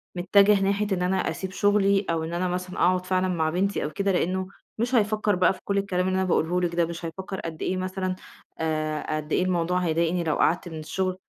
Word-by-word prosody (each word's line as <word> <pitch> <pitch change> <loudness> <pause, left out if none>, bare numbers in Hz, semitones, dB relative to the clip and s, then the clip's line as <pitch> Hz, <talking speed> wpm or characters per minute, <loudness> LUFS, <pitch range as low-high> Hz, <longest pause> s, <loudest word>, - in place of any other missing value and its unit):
متّجه 200 +3 +4
ناحية 200 +2 +1
إن 185 -2 0
أنا 185 +1 +1
أسيب 190 -1 -5
شُغلي 200 0 +2
أو 165 -1 0
إن 165 +1 -5
أنا 180 +1 0
مثلًا 180 +1 -4
أقعد 185 +1 +2
فعلًا 185 0 +1
مع 165 -3 0
بنتي 195 +5 0
أو 150 - -2
كده، 200 +4 -1
لإنّه 185 +1 0 0.3
مش 245 +3 0
هيفكّر 215 -2 +2
بقى 180 +1 +3
في 185 - -13
كل 200 - -1
الكلام 185 -2 0
اللي 185 - 0
أنا 190 - +1
باقوله 175 +1 +1
لِك 170 -1 -1
ده، 170 -1 +3
مش 170 +1 -6
هيفكّر 190 +4 -6
قد 160 -1 -6
أيه 185 - -1
مثلًا 185 0 -2 0.4
آآ 155 -1 -1
قد 155 0 -7
إيه - - +3
الموضوع 180 -1 +1
هيضايقني 170 0 0
لو 155 -2 0
قعدت 175 +1 +1
من 160 -1 -7
الشُغل، 185 +4 -2
180 Hz, 225 wpm, -25 LUFS, 170-195 Hz, 0.4 s, متّجه